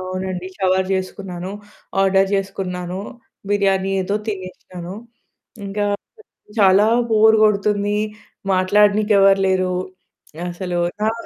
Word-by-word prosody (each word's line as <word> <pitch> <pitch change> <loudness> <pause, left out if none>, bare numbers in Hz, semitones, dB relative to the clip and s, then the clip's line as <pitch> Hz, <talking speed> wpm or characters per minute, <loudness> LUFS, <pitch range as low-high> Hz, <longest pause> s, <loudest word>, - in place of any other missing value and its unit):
అవునండి. 185 0 -4
Shower 190 -1 +2
జేసుకున్నాను. 185 -1 -4 0.5
Order 195 0 +3
జేసుకున్నాను. 185 -2 -3 0.5
Biryani 195 -1 +2
ఏదో 200 +2 -2
తినేసినాను. 185 -2 -7 0.7
ఇంకా 205 +1 -1 0.7
చాలా 195 +1 +5 0.2
బోర్ 220 0 +5
కొడుతుంది. 205 0 +1 0.6
మాట్లాడనీకి 205 +3 +3
ఎవరు 195 0 +5
లేరు. 185 -1 +1 0.8
అసలు 175 0 -3 0.3
ఆ! - - 0
190 Hz, 90 wpm, -20 LUFS, 185-205 Hz, 0.8 s, చాలా